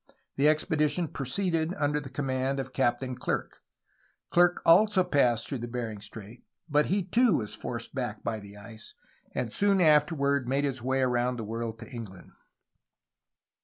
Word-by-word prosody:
The 145 +2 +4
expedition 155 +1 +1
proceeded 165 +5 -1
under 150 0 0
the 140 -2 -8
command 135 0 -1
of 130 -1 -5
Captain 125 0 0
Clerke. 125 - -3 0.7
Clerke 175 0 +4
also 190 +3 +6
passed 125 -8 +2
through 135 - -4
Bering 115 -3 -5
Strait, 110 +3 -11 0.2
but 150 -1 +2
he 195 +1 +1
too 225 0 +3
was 105 -2 -4
forced - - -6
back - - -4
by 110 -2 -2
the 100 0 -12
ice, 110 +1 -12 0.4
and 115 -3 -2
soon 200 -1 +2
afterward 145 -4 +3
made 140 +2 +1
his 135 -3 -2
way 130 +2 0
around 125 0 +1
the 115 - -4
world 115 +1 -4
to 115 - -8
England. 110 -7 -9
135 Hz, 155 wpm, -28 LUFS, 120-155 Hz, 0.7 s, also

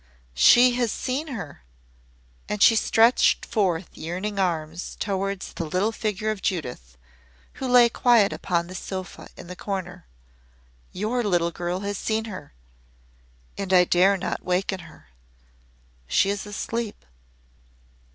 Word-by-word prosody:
"She 245 - +6
has 240 -3 +1
seen 265 +7 -3
her!" 200 - -7 0.9
And 210 -1 +1
she 225 - +7
stretched 225 +2 +3
forth 190 -6 -1
yearning 185 +5 -4
arms 165 -2 -2
towards 195 -1 -3
the - - -4
little 185 +7 0
figure 215 -1 -2
of 210 -3 -6
Judith, 125 - -4 0.6
who 265 - -1
lay 245 -1 +6
quiet 235 -3 +3
upon 170 -1 -1
the 180 - -10
sofa 185 0 -7
in - - -10
the 180 +1 -8
corner. 185 -2 -6 0.8
"Your 220 +6 -1
little 175 -5 +1
girl 175 +2 -3
has 205 -1 -3
seen 220 0 -1
her 200 -5 -9 1.1
and 195 -1 -3
I 180 -1 +7
dare 185 +3 +3
not 185 - -4
waken 185 +1 -1
her. 155 - -15 1.0
She 195 - +2
is 205 +1 -4
asleep." 220 - -4
195 Hz, 130 wpm, -24 LUFS, 175-220 Hz, 1.1 s, she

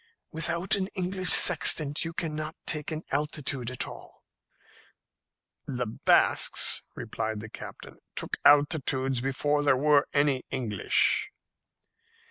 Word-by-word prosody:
"Without 170 +3 +1
an 190 -1 +1
English 185 0 -3
sextant 155 -3 +4
you 165 - -5
cannot 155 -1 -5
take 150 -2 0
an 155 +1 -5
altitude 140 -3 -3
at 130 - 0
all." - - -11 1.4
"The 125 -2 -3
Basques," 110 - +2
replied 110 -1 -5
the 110 +1 -9
captain, - - -11 0.2
"took - - -2
altitudes 140 -3 +2
before 145 +3 -1
there 145 -3 +2
were 145 +1 +2
any 145 -3 +1
English." 115 -7 +1
145 Hz, 110 wpm, -27 LUFS, 130-155 Hz, 1.4 s, sextant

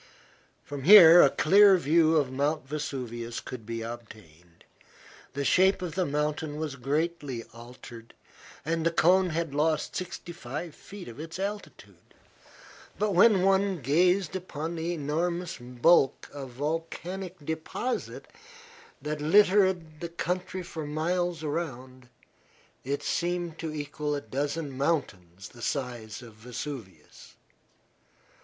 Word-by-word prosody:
From 145 -1 -7
here 175 0 +10
a 140 - +6
clear 195 +7 +6
view 160 0 +3
of 140 -4 +1
Mt. 145 +2 -1
Vesuvius 125 -5 -5
could 115 -4 -9
be 115 -1 -4
obtained. 105 -8 -11 0.7
The 140 0 -3
shape 190 +3 +3
of 170 -3 -4
the 185 -2 0
mountain 150 +1 -2
had 145 -5 -5
greatly 145 -3 -2
altered 120 -1 -12 0.5
and 165 +1 -1
the 165 - +3
cone 180 +3 +3
had 165 -2 -2
lost 150 +1 0
sixty 180 0 -5
five 155 +1 -6
feet 195 +3 -11
of 120 +4 -10
its 165 +2 -7
altitude. 205 +2 -7 0.8
But 210 0 0
when 190 +1 +5
one 195 -1 +2
gazed 180 +7 +2
upon 165 -3 -5
the 165 +1 -2
enormous 170 +3 -2
bulk 125 +4 +2
of 140 -2 -7
volcanic 165 +6 -4
deposit 160 - -4 0.8
that 150 0 -3
littered 185 -2 +3
the 170 - -4
country 180 +2 -3
for 160 -3 -6
miles 170 +2 -1
around, 130 -5 -5 0.7
it 140 +2 -3
seemed 175 +1 -2
to 160 -2 -4
equal 150 0 -3
a 145 - -3
dozen 145 +2 -3
mountains 100 - -2
the 120 - -15
size 120 -4 -4
of 115 -2 -12
Vesuvius. 115 -1 -9
155 Hz, 125 wpm, -28 LUFS, 135-175 Hz, 0.8 s, here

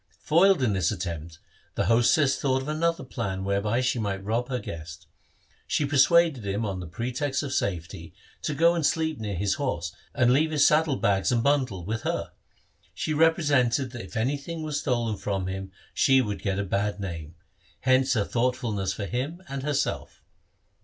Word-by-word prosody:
Foiled 175 0 +4
in 110 -5 +2
this 95 -4 +1
attempt, 85 -4 -5 0.4
the - - 0
hostess 120 +5 +4
thought 130 -1 0
of - - -8
another 165 0 0
plan 95 -7 -4
whereby 100 +5 0
she 130 -1 0
might 100 -2 -2
rob 115 +5 -1
her 125 - -1
guest. 85 -4 -8 0.6
She 150 - +1
persuaded 145 -1 +4
him, 100 +3 -2
on 95 -3 -3
the 90 - -6
pretext 125 - -2
of 135 -2 -4
safety, 85 -3 -3 0.3
to 150 - -2
go 165 +3 +4
and 170 -2 -1
sleep 160 -1 0
near 105 -3 -3
his 100 +2 0
horse 85 - -2 0.2
and 125 -2 +4
leave 155 +4 +3
his 150 -2 +3
saddle 155 -2 +4
bags 100 -4 +1
and 120 -2 +1
bundle 130 -11 +1
with 110 +3 -3
her. - - -2 0.6
She 155 - -2
represented 145 -5 +2
that 120 -1 -7
if - - -8
anything 145 +7 -2
were 155 - -4
stolen 120 -7 -1
from 95 -2 -2
him 95 0 -5 0.2
she 135 0 +4
would 105 -5 -2
get 100 -1 -1
a 100 - 0
bad 100 +2 -1
name; 85 -4 -6 0.5
hence 130 0 +3
her 105 -3 +1
thoughtf 125 +3 0
ulness 100 -6 -2
for 100 - -4
him 140 - -4
and 135 0 -4
herself. 145 0 -2
120 Hz, 180 wpm, -26 LUFS, 100-140 Hz, 0.6 s, Foiled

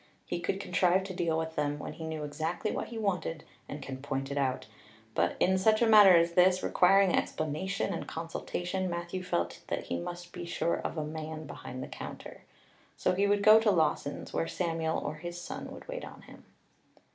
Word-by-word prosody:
He - - -3
could 175 +3 -2
contrive 180 0 +2
to 190 0 -6
deal 170 -3 0
with 160 0 -3
them 145 0 0
when 150 - -6
he 160 - -7
knew 160 -1 -4
exactly 155 +8 -2
what - - -3
he 230 - -7
wanted 185 -6 -2 0.3
and 145 -1 -6
could 130 -1 -7
point 135 -1 -3
it 140 - -3
out; 130 -2 0 0.5
but - - +1
in 190 +1 +3
such 215 +3 +4
a 235 - +4
matter 210 -4 +8
as 170 0 +4
this, 180 +1 +4
requiring 195 +1 +4
explanation 155 +6 -1
and - - -5
consultation, 175 +3 -3
Matthew 175 +1 -4
felt 85 - -2
that - - -2
he 85 - -3
must 175 - -7
be 175 - -6
sure 170 0 0
of - - -4
a 155 - -1
man 155 0 -6
behind 130 -3 -7
the - - -6
counter. - - -8 0.6
So - - +1
he 200 +2 +2
would 205 0 +2
go 215 +1 +9
to 220 -1 +2
Lawson's, 155 -5 0
where 165 - 0
Samuel 165 -2 -1
or 150 - -3
his 175 +2 -6
son 175 - -6
would - - -11
wait - - -5
on - - -10
him. - - -15
170 Hz, 205 wpm, -30 LUFS, 155-190 Hz, 0.6 s, go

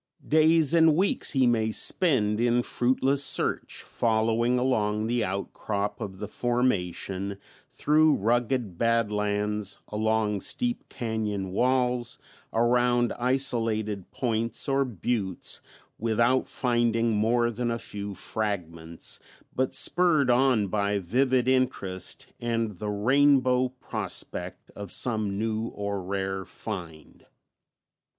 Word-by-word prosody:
Days 160 0 +4
and 160 -2 +5
weeks 190 +5 +1
he 135 -2 +3
may 110 -2 +2
spend 110 - +2
in 120 +1 +2
fruitless 130 +4 +1
search - - 0
following 115 +2 +1
along 110 -4 0
the 120 0 0
outcrop 100 +1 -3
of 95 -2 -6
the 105 - -5
formation, 100 -5 -1 0.3
through 155 0 +3
rugged 115 -3 -1
badlands, 105 -3 0
along 105 -1 0
steep 245 -1 -2
cañon 105 -5 -3
walls, 125 +2 +1 0.3
around 120 +1 +2
isolated 115 -6 0
points 115 -2 -2
or 135 0 +2
buttes, 105 -4 -3 0.4
without 115 +3 +1
finding 120 -2 +1
more 120 +3 +2
than 120 +1 -2
a 115 - -1
few 100 -3 -6
fragments, 85 -6 -4 0.4
but 130 0 0
spurred 160 -7 +4
on 125 -4 +3
by 100 +1 0
vivid 125 +7 +1
interest 125 -8 0
and 115 -5 -2
the 105 - -3
rainbow 130 +3 +3
prospect 130 0 -4
of 100 -3 -8
some 110 -5 0
new 110 +1 -1
or 100 -2 -4
rare 95 +1 -3
find. 85 -4 -9
115 Hz, 110 wpm, -27 LUFS, 105-125 Hz, 0.4 s, and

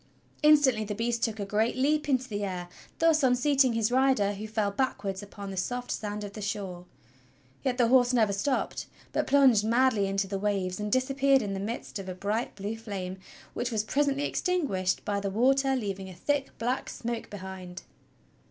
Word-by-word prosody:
Instantly 290 -7 +5
the 210 0 -4
beast 230 +1 -1
took 225 -2 -1
a 200 - -2
great 215 +3 +1
leap 295 +3 +1
into 260 -1 +1
the 205 -3 -3
air, 180 -3 -4 0.3
thus 325 -1 +4
unseating 260 0 +3
his 225 0 +1
rider 255 -6 +3
who 210 +2 -6
fell 215 -2 0
backwards 200 -5 -2
upon 200 -1 -8
the 190 - -7
soft 245 +6 -2
sand 210 -1 -3
of 200 -1 -7
the 210 - -7
shore. 195 -3 -4 0.8
Yet 250 -2 0
the 240 -2 +4
horse 245 0 +5
never 220 -5 +3
stopped, 255 +7 -1 0.3
but - - 0
plunged 265 -6 +5
madly 230 -2 +3
into 195 0 0
the 195 0 -3
waves 195 -2 -1
and 210 0 -3
disappeared 270 +1 +3
in 200 -1 -3
the 195 - -3
midst 215 +1 -5
of 190 -1 -6
a 185 - -5
bright 210 +5 -2
blue 205 +3 -4
flame 190 -4 -5 0.3
which 245 +1 -2
was 215 -2 0
presently 280 +4 +1
extinguished 280 - 0
by 205 -1 0
the 200 0 -2
water 270 +6 +3
leaving 195 -5 -4
a 185 - -10
thick 285 +6 -1
black 245 +3 -2
smoke 235 -1 -4
behind. 190 -2 -8
220 Hz, 190 wpm, -28 LUFS, 200-260 Hz, 0.8 s, Instantly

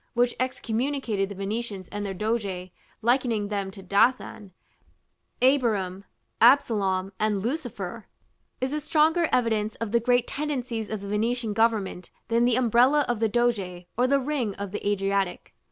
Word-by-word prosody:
which 245 0 +2
excommunicated 240 -4 -1
the 200 - -7
Venetians 200 -1 -4
and 205 0 -4
their 195 -1 -4
doge, 195 -3 -2 0.3
likening 235 -4 +1
them 200 -2 -2
to 190 0 -11
Dathan, 205 0 +1 0.9
Abiram, 210 -8 +2 0.4
Absalom, 200 -7 +3
and 210 -2 0
Lucifer, 235 - -4 0.5
is 260 +2 -2
a 300 - 0
stronger 315 +3 +2
evidence 220 -3 +1
of 230 -3 -4
the 235 - +4
great 245 +1 +2
tendencies 255 -7 -3
of 215 -2 -4
the 200 - -7
Venetian 225 +2 -1
government 215 -5 0 0.2
than 235 +1 +3
the 245 -1 +3
umbrella 255 +4 +4
of 240 -3 -1
the 225 -1 +2
doge 200 -7 0
or 250 +2 +2
the 280 +1 +4
ring 260 -7 -2
of 200 -1 -5
the 210 - -5
Adriatic. 195 -2 -1
225 Hz, 150 wpm, -26 LUFS, 200-245 Hz, 0.9 s, the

